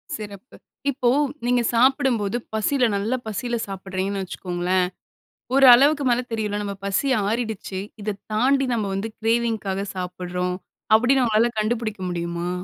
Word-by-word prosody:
சிறப்பு. 210 Hz, +2 st, -9 dB, 0.4 s
இப்போ 250 Hz, -2 st, +1 dB, 0.4 s
நீங்க 245 Hz, 0 st, +3 dB
சாப்பிடும்போது 240 Hz, -4 st, +2 dB, 0.2 s
பசில 245 Hz, +3 st, +2 dB
நல்ல 205 Hz, +5 st, -1 dB
பசில 240 Hz, +3 st, -2 dB
சாப்பிடுறீங்கனு 195 Hz, 0 st, -3 dB
வச்சுக்கோங்களேன் 180 Hz, 0 st, -1 dB, 0.7 s
ஒரு 275 Hz, 0 st, +6 dB
அளவுக்கு 285 Hz, +3 st, +5 dB
மேல 240 Hz, +1 st, +2 dB
தெரியும்ல்ல 210 Hz, -2 st, -2 dB
நாம 200 Hz, -1 st, -4 dB
பசி 200 Hz, +8 st, 0 dB, 0.2 s
ஆறிடுச்சி. 220 Hz, -4 st, -3 dB, 0.2 s
இத 205 Hz, -1 st, -3 dB, 0.2 s
தாண்டி 270 Hz, +4 st, +2 dB
நம்ம 220 Hz, -3 st, 0 dB
வந்து 215 Hz, +3 st, -3 dB
கிரேவிங்காக 225 Hz, -4 st, 0 dB
சாப்பிடுகிறோம் 180 Hz, 0 st, -3 dB, 0.4 s
அப்படினு 250 Hz, +3 st, +4 dB
உங்களால 225 Hz, +1 st, +3 dB
கண்டுபுடிக்க 215 Hz, -2 st, -2 dB
முடியுமா? 170 Hz, 0 st, -3 dB
215 Hz, 125 wpm, -23 LUFS, 190-240 Hz, 0.7 s, ஒரு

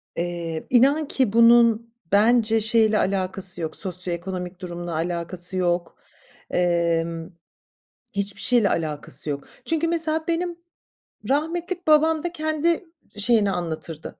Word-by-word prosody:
Eee, 170 Hz, -2 st, -4 dB
inan 275 Hz, +5 st, +4 dB
ki 250 Hz, -6 st, 0 dB
bunun 230 Hz, -1 st, +5 dB, 0.2 s
bence 225 Hz, +2 st, +3 dB
şeyle 220 Hz, 0 st, +3 dB
alakası 185 Hz, -2 st, -1 dB
yok, 160 Hz, -1 st, -4 dB
sosyoekonomik 180 Hz, -1 st, -2 dB
durumla 175 Hz, -1 st, -6 dB
alakası 175 Hz, +2 st, -2 dB
yok, 175 Hz, -1 st, -1 dB, 0.5 s
emm, 170 Hz, -1 st, 0 dB, 0.8 s
hiçbir 200 Hz, -1 st, -3 dB
şeyle 235 Hz, -6 st, +3 dB
alakası 150 Hz, -3 st, 0 dB
yok. 140 Hz, -1 st, -3 dB, 0.2 s
Çünkü, 330 Hz, 0 st, 0 dB
mesela, 320 Hz, -1 st, 0 dB
benim 340 Hz, +1 st, -2 dB, 0.7 s
rahmetlik 340 Hz, +5 st, -2 dB
babam 310 Hz, 0 st, +4 dB
da 345 Hz, -, -2 dB
kendi 315 Hz, +2 st, 0 dB, 0.3 s
şeyini 205 Hz, -2 st, +2 dB
anlatırdı, 165 Hz, -3 st, -5 dB
200 Hz, 110 wpm, -23 LUFS, 175-285 Hz, 0.8 s, bunun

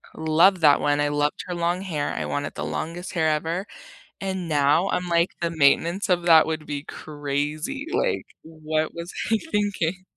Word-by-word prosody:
love 165 Hz, +4 st, +3 dB
that 150 Hz, -2 st, +5 dB
one, 145 Hz, 0 st, +1 dB
I 145 Hz, 0 st, +1 dB
loved 145 Hz, 0 st, -1 dB
her 180 Hz, -, -3 dB
long 175 Hz, +2 st, 0 dB
hair, 155 Hz, -7 st, -3 dB
I 75 Hz, -, -3 dB
wanted 75 Hz, -1 st, -3 dB
the -, -, -4 dB
longest 165 Hz, -, -5 dB
hair 160 Hz, -2 st, +1 dB
ever, 165 Hz, +5 st, -1 dB, 0.6 s
and 190 Hz, -2 st, -3 dB
now 150 Hz, +4 st, +2 dB
I'm 180 Hz, 0 st, -1 dB
like, 170 Hz, +1 st, +2 dB
"The 170 Hz, -, 0 dB
maintenance 165 Hz, +5 st, +2 dB
of 175 Hz, -1 st, +2 dB
that 165 Hz, -2 st, +7 dB
would 160 Hz, -1 st, -4 dB
be 145 Hz, -1 st, -4 dB
crazy," 150 Hz, -, -4 dB
like, 455 Hz, +6 st, 0 dB, 0.2 s
what 155 Hz, -1 st, -3 dB
was 170 Hz, +1 st, -7 dB, 0.2 s
I 225 Hz, -, +4 dB
thinking? 190 Hz, -4 st, -1 dB
160 Hz, 175 wpm, -24 LUFS, 150-180 Hz, 0.6 s, that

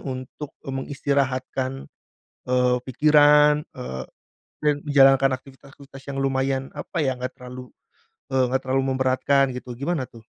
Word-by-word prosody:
untuk, 130 Hz, +2 st, -6 dB, 0.2 s
eee, 135 Hz, -, -5 dB
mengistirahatkan, 135 Hz, -1 st, -1 dB, 0.7 s
eee, 125 Hz, 0 st, +2 dB
pikiran, 150 Hz, +2 st, +5 dB
eee, 65 Hz, -, -6 dB, 0.6 s
dan 150 Hz, -1 st, +4 dB
menjalankan 135 Hz, -2 st, +5 dB
aktivitas-aktivitas 135 Hz, +1 st, -15 dB
yang 135 Hz, -, -5 dB
lumayan 135 Hz, 0 st, -1 dB
apa 145 Hz, +4 st, -7 dB
ya, 130 Hz, -, +1 dB
enggak 125 Hz, 0 st, -5 dB
terlalu, 125 Hz, 0 st, -10 dB, 0.6 s
eee, 130 Hz, -1 st, +3 dB
enggak 130 Hz, +1 st, 0 dB
terlalu 130 Hz, +1 st, +1 dB
memberatkan 130 Hz, +1 st, +2 dB
gitu. 125 Hz, 0 st, -8 dB
Gimana 140 Hz, 0 st, -2 dB
tuh? 115 Hz, -2 st, -16 dB
135 Hz, 125 wpm, -23 LUFS, 130-140 Hz, 0.7 s, pikiran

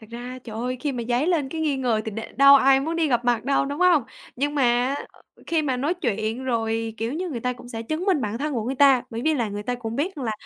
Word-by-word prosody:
thật 220 Hz, -, -14 dB
ra 245 Hz, +2 st, -7 dB
trời 220 Hz, -2 st, -8 dB
ơi 250 Hz, +2 st, -2 dB
khi 290 Hz, -2 st, -1 dB
mà 240 Hz, -2 st, -3 dB
dấy 245 Hz, +6 st, +1 dB
lên 315 Hz, -7 st, +1 dB
cái 320 Hz, +2 st, -5 dB
nghi 295 Hz, -3 st, 0 dB
ngờ 240 Hz, -4 st, 0 dB
thì 220 Hz, -, -4 dB
đ 215 Hz, -, -6 dB, 0.2 s
đâu 275 Hz, +1 st, +8 dB
ai 270 Hz, 0 st, +5 dB
muốn 325 Hz, +4 st, -2 dB
đi 320 Hz, -3 st, +1 dB
gặp 240 Hz, -1 st, +1 dB
mặt 240 Hz, -1 st, +1 dB
đâu, 275 Hz, 0 st, +2 dB
đúng 285 Hz, +1 st, -4 dB
hông? 350 Hz, -7 st, +5 dB, 0.3 s
Nhưng 290 Hz, +3 st, -1 dB
mà 280 Hz, -, +1 dB, 0.3 s
á, -, -, -5 dB
ờ, -, -, -22 dB, 0.2 s
khi 325 Hz, -2 st, +1 dB
mà 265 Hz, -4 st, -1 dB
nói 295 Hz, +8 st, 0 dB
chuyện 230 Hz, -, -2 dB
rồi, 225 Hz, -2 st, -1 dB
kiểu 225 Hz, +3 st, -3 dB
như, 360 Hz, +3 st, -3 dB
người 245 Hz, -7 st, -4 dB
ta 250 Hz, +1 st, -1 dB
cũng 245 Hz, 0 st, -12 dB
sẽ 225 Hz, -1 st, -5 dB
chứng 310 Hz, +9 st, -3 dB
minh 370 Hz, -8 st, +2 dB
bản 215 Hz, +1 st, -3 dB
thân 300 Hz, +1 st, -2 dB
của 225 Hz, -, -1 dB
người 260 Hz, +3 st, -2 dB
ta. 270 Hz, -2 st, +5 dB
Bởi 230 Hz, +1 st, -5 dB
vì 315 Hz, 0 st, +3 dB
là 235 Hz, -6 st, -1 dB
người 205 Hz, +1 st, -5 dB
ta 245 Hz, +3 st, -2 dB
cũng 230 Hz, -2 st, -5 dB
biết 350 Hz, +7 st, -1 dB
rằng 265 Hz, -, -5 dB
là, 220 Hz, -, -1 dB
255 Hz, 305 wpm, -24 LUFS, 230-290 Hz, 0.3 s, đâu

